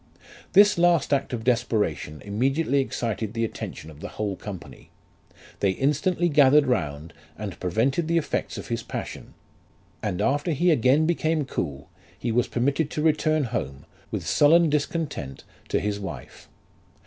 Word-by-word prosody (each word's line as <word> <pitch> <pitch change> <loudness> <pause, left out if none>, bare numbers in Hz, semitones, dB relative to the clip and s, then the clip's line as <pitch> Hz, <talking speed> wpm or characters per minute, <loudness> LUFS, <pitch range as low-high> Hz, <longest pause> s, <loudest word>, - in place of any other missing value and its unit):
"This 205 -1 +6
last 170 -4 +3
act 135 -1 0
of 120 -3 -4
desperation 110 -11 0
immediately 135 +8 +1
excited 115 -4 -2
the 115 0 +1
attention 80 -7 -7
of 75 - -14
the - - -6
whole 105 -2 -3
company; 90 -10 -9 0.7
they 95 -2 +2
instantly 150 - +1
gathered 145 -2 +5
round, 80 - -2 0.2
and 105 -2 -6
prevented 125 - 0
the 170 0 +2
effects 165 - -2
of - - -8
his 115 -1 -1
passion; - - -7 0.7
and 95 -4 -2
after 145 +4 +1
he 175 +5 +3
again 140 +2 +4
became 160 -2 0
cool, 70 - -4 0.3
he 120 - -2
was 120 +1 +2
permitted 140 +5 0
to 150 - -3
return 155 -1 +2
home, 70 - -4 0.2
with - - -4
sullen 160 +2 +5
discontent, 145 - -2 0.2
to - - +1
his 105 0 -2
wife. 95 - -8
130 Hz, 150 wpm, -25 LUFS, 105-155 Hz, 0.7 s, This